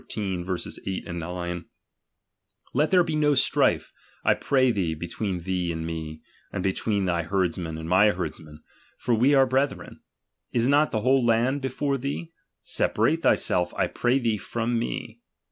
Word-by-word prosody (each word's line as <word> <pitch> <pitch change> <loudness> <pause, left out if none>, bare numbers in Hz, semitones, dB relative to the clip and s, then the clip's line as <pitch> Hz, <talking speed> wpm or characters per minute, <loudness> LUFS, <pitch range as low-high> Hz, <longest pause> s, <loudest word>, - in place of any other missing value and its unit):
8, 95 -1 -3
9); 85 0 -4 1.1
Let 150 +2 +2
there 180 -2 +5
be 160 -2 -2
no 150 -1 +3
strife, 130 - +2 0.3
I - - +5
pray 130 -2 +2
thee, 90 -7 -1
between 90 +3 -4
thee 90 -1 -1
and 80 -1 -4
me, 80 -1 -6 0.3
and - - -3
between 100 +1 0
thy 85 -2 +1
herd 90 0 0
men 80 -3 -5
a?id 80 - -6
my 95 +5 +5
herdmen; 80 -5 -5 0.3
for 120 - 0
we 130 +6 +4
be 135 -1 +6
brethren. 135 +2 -1 0.5
Is 120 0 +1
not 145 +2 +4
the 110 - -1
whole 130 +2 +3
land 120 +4 +2
before 135 +1 -1
thee? 145 +5 -4 0.3
Separate 165 +1 +1
thyself, 90 - +1
I - - +2
pray 125 +2 +1
thee 115 -5 0
from 115 +2 -2
me. 115 0 -4
105 Hz, 155 wpm, -26 LUFS, 90-130 Hz, 1.1 s, be